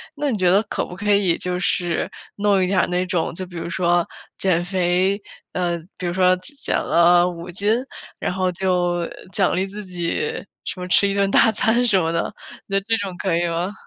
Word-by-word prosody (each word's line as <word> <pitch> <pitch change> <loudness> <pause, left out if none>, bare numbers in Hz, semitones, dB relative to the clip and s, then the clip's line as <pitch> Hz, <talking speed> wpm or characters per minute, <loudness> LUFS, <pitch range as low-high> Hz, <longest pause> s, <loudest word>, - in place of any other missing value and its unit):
那 290 -1 -1
你 220 - -1
觉 180 -2 +3
得 200 +3 +5
可 - - -3
不 180 - -10
可 205 +1 +1
以 195 -4 +2
就 180 0 -2
是 175 -2 0 0.2
弄 200 -2 +2
一 185 - +2
点 190 0 +3
儿 - - 0
那 180 +1 0
种， 175 -2 -1
就 185 +2 -5
比 175 - -13
如 170 - -4
说 175 -1 +2 0.3
减 175 -2 +1
肥， 185 +2 +1 0.3
呃， 175 -1 0 0.2
比 180 - -5
如 175 - 0
说 185 0 +4
减 185 +11 -5
减 - - -2
了 175 +1 +4
5 170 0 -8
斤？ 205 +5 +1 0.5
然 - - -2
后 185 0 0
就 175 -1 0 0.3
奖 195 0 +1
励 185 +1 0
自 205 +1 -8
己 185 - -3 0.2
什 - - -4
么 180 - -3
吃 200 - +5
一 200 - -1
顿 200 -1 +1
大 225 - +6
餐 235 +4 +2
什 195 -4 +4
么 165 0 0
的， 165 - -2 0.3
你 195 - -2
觉 - - +5
得 195 - -23
这 225 - +5
种 195 -3 -4
可 175 -2 0
以 175 0 +1
吗？ 175 +4 -2
185 Hz, 240 characters per minute, -21 LUFS, 175-200 Hz, 0.5 s, 大